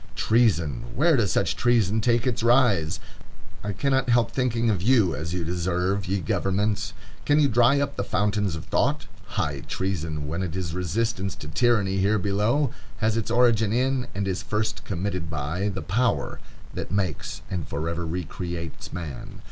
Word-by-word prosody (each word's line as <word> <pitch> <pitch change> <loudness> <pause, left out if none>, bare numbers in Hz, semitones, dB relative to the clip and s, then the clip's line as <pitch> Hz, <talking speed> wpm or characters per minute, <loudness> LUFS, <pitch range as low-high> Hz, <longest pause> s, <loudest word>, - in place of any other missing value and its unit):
Treason! 85 - +2
Where 160 +3 +4
does 115 -6 +2
such 125 - +1
treason 110 -3 +2
take 120 +1 +2
its 125 -4 0
rise? 115 - +3 0.6
I 105 - -2
cannot 135 +3 +1
help 120 -1 +3
thinking 120 -3 +1
of 95 -4 -1
you 110 -4 +4
as 80 +1 -4
you 90 -1 -2
deserve, 90 +3 -1
ye 95 +2 0
governments. 100 +5 0 0.3
Can 145 +1 +3
you 145 - +5
dry 120 +3 +4
up 140 - -1
the - - 0
fountains 105 -3 0
of 80 - -7
thought? - - +1 0.3
High - - 0
treason, 80 -6 -2
when 85 +5 -2
it 90 -2 -3
is 90 -4 -3
resistance 95 +2 -1
to 75 - -9
tyranny 100 +2 +2
here 100 +3 +3
below, 105 +8 +1 0.3
has 110 -1 +1
its 115 -1 -1
origin 115 -3 +3
in, 130 +1 +1
and 100 0 -1
is 95 0 -1
first 110 +3 -2
committed 90 -3 -3
by, 80 +7 -2
the 95 -2 -4
power 120 +6 0 0.3
that - - -5
makes 95 -6 -2
and 90 -5 -3
forever 85 +3 -3
recreates 85 -1 -5
man. 80 -6 -7
100 Hz, 165 wpm, -25 LUFS, 90-115 Hz, 0.6 s, you